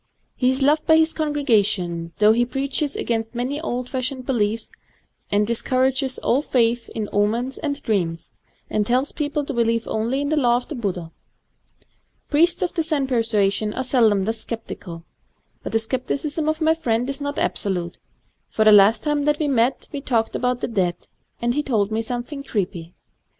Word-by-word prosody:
He 250 - +2
is 260 +1 +1
loved 300 +2 +3
by 320 -1 +6
his 320 0 +3
congregation, 210 - 0
though 210 0 +6
he 235 +2 +3
preaches 275 +3 -2
against 225 0 -2
many 260 +5 -2
old 250 -5 -3
fashioned 255 0 -3
beliefs, 225 -3 -1 0.6
and 205 +1 +3
discour 255 +3 +1
ages 265 0 -2
all 265 - +1
^th 240 -4 +1
in 215 -2 -4
omens 230 +6 0
and 285 -2 -2
dreams, 170 -6 -1 0.4
and 210 - 0
tells 250 +6 +1
peo 295 -2 -2
ple 295 0 -2
to 280 - -4
believe 230 -1 +1
only 230 +5 -1
in 285 - -1
the 310 - +1
Law 240 -4 +4
of 245 - -7
the - - -4
Buddha. 185 - -4 1.2
Priests 335 +5 +3
of 355 - -2
the 330 - 0
Zen 310 -4 0
persuasion 215 -4 +1
are 260 - -1
seldom 225 -7 +3
thus 225 +1 -3
sceptical. 175 -7 -7 0.6
But - - -6
the 225 - +3
scepticism 275 +6 -2
of 310 +1 -2
my 320 0 +4
friend 245 -6 -1
is 275 +1 -4
not 285 0 -3
absolute; 180 -4 -2 0.5
for 220 - +1
the 215 - +8
last 210 +2 +6
time 295 -1 0
that 295 0 +2
we 305 - 0
met 255 -1 +1
we 285 -3 -5
talked 230 -5 0
of 250 0 0
the - - -1
dead, 185 -7 0 0.4
and 240 0 0
he 295 - +1
told 220 -8 0
me 220 +1 0
something 245 +5 -5
creepy. 180 -8 -3
240 Hz, 185 wpm, -22 LUFS, 215-280 Hz, 1.2 s, the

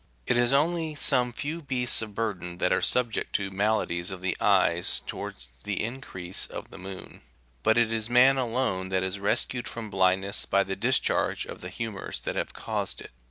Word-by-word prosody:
It - - +2
is 120 0 +3
only 160 +2 +1
some 125 -3 +2
few 155 +7 -4
beasts 125 -5 +1
of 105 -2 -7
burden 90 -6 -3
that 90 - +1
are 90 - +3
subject 120 +5 +1
to 95 -1 0
maladies 95 -3 0
of 95 -2 -6
the 90 - 0
eyes - - +4
towards 60 - -6
the 105 -1 -2
increase 110 -7 -3
of - - -8
the - - -10
moon: 95 0 -9 0.4
but 110 +1 +3
it 115 -1 +3
is 110 0 0
man 125 +3 +6
alone 115 -7 -1
that 95 -1 +1
is 95 +2 -2
rescued 120 +4 0
from 110 -3 -6
blindness 95 +1 +1
by 100 - +3
the 95 0 -4
discharge - - +1
of - - -9
the 90 - -6
humours98 110 -1 -5
that - - -3
have - - -2
caused - - -3
it. - - -11
110 Hz, 190 wpm, -27 LUFS, 95-125 Hz, 0.4 s, man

